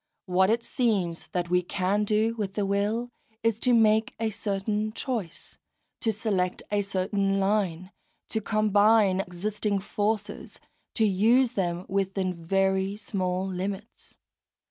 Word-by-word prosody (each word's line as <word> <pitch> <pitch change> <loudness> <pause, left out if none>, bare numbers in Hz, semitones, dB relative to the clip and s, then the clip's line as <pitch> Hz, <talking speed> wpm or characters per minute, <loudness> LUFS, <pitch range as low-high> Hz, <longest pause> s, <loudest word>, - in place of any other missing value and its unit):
What 190 0 +3
it 230 +1 +1
seems 200 -12 -1
that 175 -1 -3
we 180 0 +4
can 195 +3 0
do 215 +2 +2
with 205 -4 -4
the 205 - 0
will 210 +5 -1 0.3
is 230 -1 +1
to 250 - +2
make 220 -1 +3
a 225 -1 0
certain 210 +1 -2
choice, 220 -10 -5 0.4
to 225 - +1
select 200 -4 -1
a 205 -1 +2
certain 195 0 0
line, 195 -3 0 0.4
to 220 - -1
combine 210 -2 +3
existing 200 +3 -2
forces, 210 +2 -3 0.4
to 220 - +3
use 230 +6 +3
them 175 -3 -2
within 190 -1 -1
very 190 +3 0
small 185 -3 -2
limits. 195 +3 -6
200 Hz, 130 wpm, -27 LUFS, 190-215 Hz, 0.4 s, we